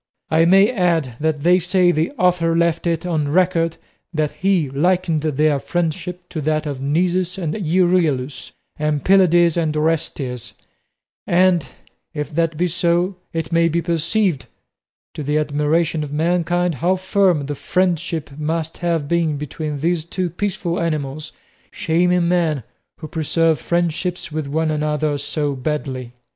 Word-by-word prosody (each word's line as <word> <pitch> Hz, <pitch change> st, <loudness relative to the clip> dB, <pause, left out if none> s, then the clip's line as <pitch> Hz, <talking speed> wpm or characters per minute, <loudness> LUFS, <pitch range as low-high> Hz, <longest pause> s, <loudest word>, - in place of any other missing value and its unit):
I 160 Hz, +1 st, +4 dB
may 195 Hz, +5 st, +5 dB
add 170 Hz, -, +1 dB
that 155 Hz, -1 st, -1 dB
they 180 Hz, +4 st, +4 dB
say 180 Hz, 0 st, +3 dB
the 160 Hz, 0 st, 0 dB
author 180 Hz, -7 st, +2 dB
left 170 Hz, 0 st, +1 dB
it 165 Hz, 0 st, -1 dB
on 160 Hz, -4 st, 0 dB
record 165 Hz, 0 st, +1 dB, 0.3 s
that 155 Hz, -3 st, -1 dB
he 175 Hz, 0 st, +1 dB
likened 165 Hz, +3 st, +1 dB
their 150 Hz, -1 st, +1 dB
friendship 175 Hz, +2 st, -3 dB
to 160 Hz, -, -4 dB
that 155 Hz, +1 st, 0 dB
of 140 Hz, -3 st, -4 dB
Nisus 180 Hz, +5 st, 0 dB
and 165 Hz, -5 st, -2 dB
Euryalus, 170 Hz, -7 st, 0 dB, 0.3 s
and 150 Hz, -2 st, -1 dB
Pylades 175 Hz, -3 st, +5 dB
and 155 Hz, -2 st, 0 dB
Orestes; 150 Hz, -6 st, -2 dB, 0.7 s
and 180 Hz, -2 st, +3 dB, 0.5 s
if 150 Hz, +1 st, -4 dB
that 165 Hz, -1 st, 0 dB
be 175 Hz, -, +1 dB
so, 175 Hz, +2 st, +1 dB, 0.2 s
it 165 Hz, -1 st, -4 dB
may 165 Hz, 0 st, +3 dB
be 170 Hz, +1 st, 0 dB
perceived, 170 Hz, 0 st, 0 dB, 0.7 s
to -, -, -6 dB
the 150 Hz, +1 st, 0 dB
admiration 150 Hz, +2 st, 0 dB
of 145 Hz, -, -6 dB
mankind, 175 Hz, +2 st, +1 dB
how 180 Hz, +3 st, +3 dB
firm 185 Hz, -3 st, +2 dB
the 145 Hz, -, -3 dB
friendship 170 Hz, -1 st, -1 dB
must 160 Hz, +1 st, -2 dB
have 165 Hz, -4 st, -1 dB
been 165 Hz, -2 st, +1 dB
between 150 Hz, 0 st, -5 dB
these 170 Hz, 0 st, +1 dB
two 175 Hz, +1 st, -3 dB
peaceful 180 Hz, -2 st, -2 dB
animals, 155 Hz, -2 st, -3 dB, 0.4 s
shaming 180 Hz, -2 st, +1 dB
men, 165 Hz, -7 st, +1 dB, 0.4 s
who 155 Hz, -, -5 dB
preserve 160 Hz, 0 st, +1 dB
friendships 175 Hz, 0 st, -2 dB
with 155 Hz, -2 st, -3 dB
one 160 Hz, +2 st, 0 dB
another 150 Hz, -1 st, -1 dB
so 145 Hz, 0 st, -2 dB
badly. 130 Hz, -3 st, -4 dB
165 Hz, 145 wpm, -20 LUFS, 150-175 Hz, 0.7 s, may